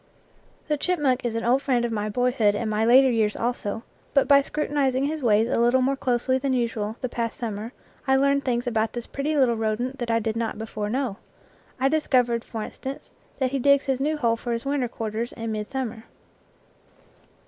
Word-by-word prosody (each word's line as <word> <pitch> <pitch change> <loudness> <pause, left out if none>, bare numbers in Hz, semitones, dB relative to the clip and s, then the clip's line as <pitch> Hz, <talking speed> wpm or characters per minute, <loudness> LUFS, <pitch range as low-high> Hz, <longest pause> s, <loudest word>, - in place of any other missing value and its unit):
The 300 -1 +1
chipmunk 290 -6 +1
is 235 -2 -2
an 230 - -2
old 255 +3 +3
friend 250 -4 +1
of 235 - -2
my 210 -1 -2
boyhood 240 -2 +2
and 225 +2 -2
my 215 +1 +1
later 255 +3 +6
years 220 -3 +1
also, 230 -2 -2 0.3
but 275 - +4
by 280 -1 +7
scrutinizing 280 -2 0
his 305 +2 -2
ways 220 -2 +3
a 240 - 0
little 240 +2 +4
more 275 +2 +1
closely 260 0 0
than 270 0 0
usual 225 -3 -1
the 255 - -1
past 235 -1 -3
summer 220 -1 -4 0.4
I 265 - +4
learned 280 +1 +2
things 245 -2 -1
about 225 -2 0
this 240 -1 -5
pretty 295 +2 -2
little 255 -4 +4
rodent 225 +5 -2
that 240 -1 -3
I 230 - +3
did 220 -1 -1
not 230 -1 -2
before 215 -1 -4
know. 245 -4 -2 0.6
I 265 - +3
discovered, 250 -6 +2
for 220 -2 -5
instance, 270 +5 -7 0.3
that 260 -2 0
he 275 - -1
digs 280 +2 +4
his 265 -2 0
new 305 +2 0
hole 230 -5 +1
for 240 +1 -3
his 230 +3 -4
winter 275 -3 0
quarters 225 +1 -4
in 225 -1 -4
midsummer. 225 +1 -4
245 Hz, 200 wpm, -25 LUFS, 225-270 Hz, 0.6 s, by